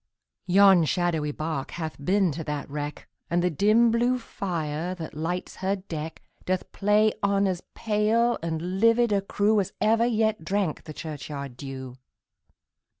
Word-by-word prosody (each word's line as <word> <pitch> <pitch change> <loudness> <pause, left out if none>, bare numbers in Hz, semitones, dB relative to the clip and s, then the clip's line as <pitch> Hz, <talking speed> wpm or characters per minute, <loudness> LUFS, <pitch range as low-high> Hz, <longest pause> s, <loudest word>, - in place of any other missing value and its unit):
Yon 190 -1 +6
shadowy 160 -2 0
bark 155 -2 -3
hath 160 -4 -6
been 190 +1 +2
to 160 +3 -5
that 150 -1 -4
wreck, 145 +1 -5 0.2
And 175 +1 +1
the 180 - +2
dim 215 +8 +4
blue 240 +2 +2
fire, 175 -6 -3
that 165 -3 -7
lights 165 +4 -4
her 190 +1 0
deck, 165 -5 -7 0.2
Doth 185 0 -2
play 210 +1 +3
on 200 0 +2
as 185 -2 -1
pale 225 +2 +1
and 170 +3 -3
livid 230 +1 +4
a 200 -1 +2
crew, 205 +2 +2
As 190 - -2
ever 225 +2 +3
yet 220 -5 +1
drank 190 -1 -1
the 155 - -7
churchyard 145 -4 -6
dew. 130 -1 -8
180 Hz, 150 wpm, -26 LUFS, 155-210 Hz, 0.2 s, Yon